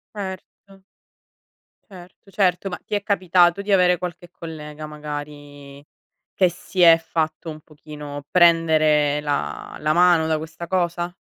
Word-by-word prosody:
Certo. 195 0 -9 1.1
Certo, 185 +1 -15
certo. 190 -1 0
Ma 180 - -6
ti - - -5
è 205 - -1
capitato 185 -2 +2
di 200 0 -2
avere 180 -2 +4
qualche 175 -1 -7
collega 155 -2 -9
magari 145 -1 -9 0.5
che 185 -2 +3
si 180 +2 -6
è 165 -1 +8
fatto 160 0 -3
un 155 0 -10
pochino 150 -1 -10
prendere 155 -4 +3
la 145 -1 -4
la 155 0 0
mano 175 -1 +4
da 160 -1 0
questa 160 +2 -8
cosa? 175 -1 -2
165 Hz, 135 wpm, -22 LUFS, 150-180 Hz, 1.1 s, è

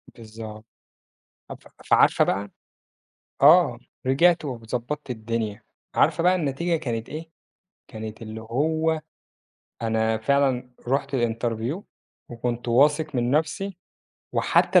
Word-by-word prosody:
بالضبط. 110 -1 -10 0.9
أف - - -7 0.3
فعارفة - - +5
بقى 100 +1 -1 0.9
آه، 150 -4 +7 0.3
رجعت 165 +6 +4
وضبّطت 125 +2 -4
الدنيا. 110 -2 -3 0.3
عارفة - - +3
بقى 180 +2 +5
النتيجة 170 +1 0
كانت 115 -6 -4
إيه؟ 160 +2 -7 0.6
كانت 110 -1 -7
اللي 110 0 -7
هو 155 +7 0 0.8
أنا 110 0 +1
فعلًا 130 +1 +1 0.2
رُحت 135 +1 0
الinterview 120 - -1 0.5
وكنت 120 0 -3
واثق 145 +5 +3
من 120 -1 +1
نَفسي، 165 +6 0 0.6
وحتى - - +4
125 Hz, 100 wpm, -25 LUFS, 115-150 Hz, 0.9 s, آه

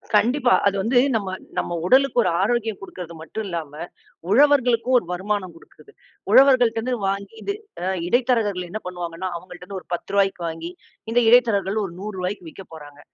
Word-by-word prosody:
கண்டிப்பா. 245 +5 +3
அது 200 - +1
வந்து 235 +5 +1 0.2
நம்ம 200 -3 -1 0.3
நம்ம 175 - -1
உடலுக்கு 260 +3 +4
ஒரு - - +1
ஆரோக்கியம் 225 -4 0
குடுக்கறது 180 -3 -9
மட்டும் 215 +7 -6
இல்லாம, 165 -5 -5 0.6
உழவர்களுக்கும் 255 -1 +4
ஒரு 205 - -1
வருமானம் 185 0 -2
குடுக்குறது. 420 - -18 0.4
உழவர்கள்டருந்து 250 -3 +5
வாங்கி 200 +2 -3
இது 400 - -2 0.3
அ - - -1 0.2
இடைத்தரகர்கள் 220 -5 +1
என்ன 215 +4 -5
பண்ணுவாங்கனா? 175 0 -5
அவங்கள்ட்ட 180 0 -12
இருந்து 195 -1 -6
ஒரு - - -27
1௦ 175 - -5
ரூபாய்க்கு 195 -2 +1
வாங்கி, 165 +1 -6 0.4
இந்த 245 - +4
இடைத்தரகர்கள் 220 -4 +3
ஒரு 170 - -8
100 210 +2 -6
ரூபாய்க்கு 180 -1 -4
விக்கப்போறாங்க. 155 -5 -12
200 Hz, 155 wpm, -22 LUFS, 180-240 Hz, 0.6 s, உழவர்கள்டருந்து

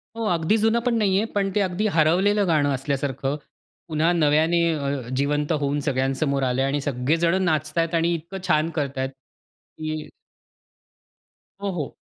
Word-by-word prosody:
हो, 230 - -4
अगदी 170 +6 +2
जुनं 225 +2 +2
पण 245 - +2
नाही 195 -3 +2
आहे, 215 - +1
पण 200 -1 0
ते 210 - +3
अगदी 195 +3 0
हरवलेलं 190 +6 +3
गाणं 150 -4 +2
असल्यासारखं 135 0 -2 0.5
पुन्हा 160 +1 +1
नव्याने 160 +1 +3
अ, 140 -4 -3
जिवंत 145 +3 0
होऊन 145 0 0
सगळ्यांसमोर 135 0 0
आलं 125 0 +1
आहे 135 - +2
आणि 145 0 -1
सगळे 135 +2 0
जण 170 +3 +2
नाचत 155 -2 -1
आहेत 165 0 +1
आणि 165 +1 +2
इतकं 170 +4 -7
छान 155 -1 +2
करत 140 -2 -2
आहेत, 130 0 -1
की 155 +3 -9 1.5
हो, 200 - -1
हो. 155 -6 -4
155 Hz, 165 wpm, -24 LUFS, 140-175 Hz, 1.5 s, ते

